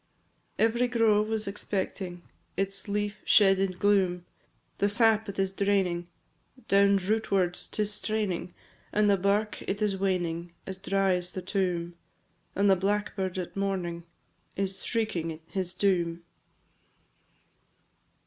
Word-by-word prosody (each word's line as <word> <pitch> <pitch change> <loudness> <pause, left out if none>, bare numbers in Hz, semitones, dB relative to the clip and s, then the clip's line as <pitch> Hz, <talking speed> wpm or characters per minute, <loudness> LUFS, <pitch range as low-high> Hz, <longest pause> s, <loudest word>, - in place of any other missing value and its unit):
II. - - +5
Every 235 +2 +1
grove 220 -3 +3
was 220 -1 -1
expecting 190 -3 -3 0.3
Its 195 +1 -2
leaf 205 0 -2
shed 195 -2 +5
in 195 -1 +1
gloom; 185 -2 +2 0.5
The 200 - +3
sap 220 0 +3
it 200 - -6
is 195 -1 0
draining, 190 -4 +1 0.6
Down 200 0 +5
rootwards 195 -2 0
'tis 210 -1 0
straining, 205 -5 -2 0.4
And 210 0 +3
the 200 - +5
bark 200 +3 0
it 200 - -3
is 210 -2 +1
waning 175 -3 -1
As 190 -1 -6
dry 195 0 +1
as 180 0 -3
the 185 - -5
tomb, 180 -3 -1 0.6
And 200 +1 +3
the 195 - +6
blackbird 195 -1 -1
at 180 -2 -5
morning 185 -4 -2 0.5
Is 195 0 -2
shrieking 170 -9 -2
his 185 0 -3
doom. 175 -4 +1
195 Hz, 130 wpm, -28 LUFS, 180-205 Hz, 0.6 s, the